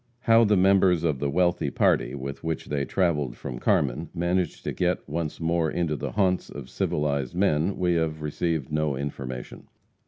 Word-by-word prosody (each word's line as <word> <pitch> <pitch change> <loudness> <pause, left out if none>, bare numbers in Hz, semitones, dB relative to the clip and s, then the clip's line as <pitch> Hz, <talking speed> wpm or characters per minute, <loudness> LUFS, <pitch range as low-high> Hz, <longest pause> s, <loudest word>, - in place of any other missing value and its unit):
How 115 -1 +5
the 105 -1 +3
members 95 -2 +4
of 75 -5 0
the 70 - -1
wealthy 90 +4 +1
party, - - +1
with 70 +1 -6
which 80 -1 -3
they 70 -1 -1
travelled 75 -9 0
from 65 -3 -6
Carmen, 75 +6 +1
managed 85 0 -1
to - - -2
get 90 0 -1
once 80 0 -3
more 80 -1 +1
into 85 -3 -1
the - - -5
haunts 95 -3 +1
of 65 -3 -9
civilized 70 0 -1
men, 90 -1 +1
we 90 -1 +1
have 80 -2 -1
received 75 -1 -2
no 75 -2 0
information. 65 -2 -6
80 Hz, 175 wpm, -26 LUFS, 70-90 Hz, -, How